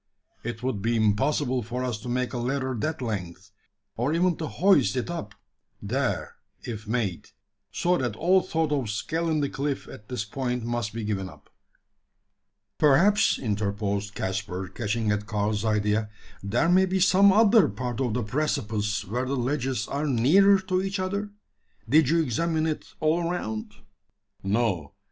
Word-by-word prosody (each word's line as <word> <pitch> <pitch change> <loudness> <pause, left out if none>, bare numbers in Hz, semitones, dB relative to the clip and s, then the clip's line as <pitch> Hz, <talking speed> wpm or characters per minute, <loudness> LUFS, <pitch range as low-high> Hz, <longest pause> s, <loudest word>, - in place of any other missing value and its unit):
It 120 0 -5
would 125 -6 -1
be 115 +3 +1
impossible 125 +5 +1
for 125 +3 -4
us 120 -4 -2
to 125 - -7
make 125 +1 -1
a 120 - -2
ladder 130 +2 -1
that 155 +4 -2
length 95 -3 -5 0.4
or 125 +6 0
even 175 0 +2
to 160 - -3
hoist 145 - +3
it 125 +7 -2
up 105 -12 -6 0.4
there - - -2 0.3
if 110 -3 -6
made 110 -6 -2 0.4
so 175 0 +1
that 120 -5 -2
all 185 +8 +3
thought 160 -4 -1
of 135 -7 0
scaling 155 +7 -1
the 140 - 0
cliff 140 0 -3
at 105 - -12
this 125 -4 -3
point 125 +1 -3
must 120 -2 -2
be 115 +2 -5
given 100 -3 -2
up." - - -17 1.3
"Perhaps," 170 +9 +4
interposed 105 -2 -2
Caspar, 95 -1 -3
catching 110 +2 -1
at 105 0 -2
Karl's 105 0 -1
idea, 105 0 +1 0.3
"there 110 +11 +1
may 185 +2 +4
be 190 +1 0
some 195 +2 +6
other 220 +1 +5
part 120 +4 -4
of 120 -5 0
the 125 - 0
precipice 105 -5 -1
where 120 +7 -2
the 140 - -1
ledges 130 +1 -1
are 145 +2 -2
nearer 165 +11 +5
to 185 -1 0
each 195 +1 -2
other? 200 +2 -2 0.6
Did 155 -2 +4
you 165 +1 +3
examine 160 +5 0
it 155 -1 -3
all 165 +2 +1
around?" 110 -12 -4 0.7
"No. 95 -6 -1
125 Hz, 160 wpm, -26 LUFS, 105-160 Hz, 1.3 s, some